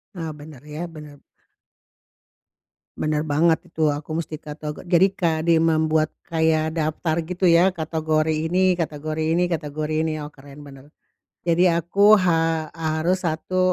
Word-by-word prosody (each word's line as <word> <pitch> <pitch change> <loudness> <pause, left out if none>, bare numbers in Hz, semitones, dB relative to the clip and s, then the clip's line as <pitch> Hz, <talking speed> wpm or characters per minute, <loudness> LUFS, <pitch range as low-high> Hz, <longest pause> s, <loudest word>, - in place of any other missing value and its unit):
Ah, 165 -3 -4
bener. 150 -3 -12
Ya, 155 +4 -6
bener. 150 -3 -12 1.8
Bener 155 0 -1
banget 160 +3 +3
itu, 160 -2 0
aku 150 +2 -5
mesti 155 -1 -8
katego 150 -1 -7
jadi 185 +2 +3
kadi 165 -3 +1
membuat 155 -1 +1 0.2
kayak 160 -1 +1
daftar 155 +1 -1
gitu 180 +1 -6
ya, 175 +1 +6
kategori 160 -1 0 0.2
ini 185 +2 +3
kategori 155 +1 -2
ini 180 0 +1
kategori 155 -1 -3
ini. 160 -1 -1
Oh, 150 - -8
keren, 140 +1 -14
bener. 140 -1 -13 0.6
Jadi 175 +1 +3
aku 180 +5 +4
ha 165 -4 +1
harus 165 +3 -1
satu, 165 +3 -2
160 Hz, 135 wpm, -22 LUFS, 155-170 Hz, 1.8 s, ya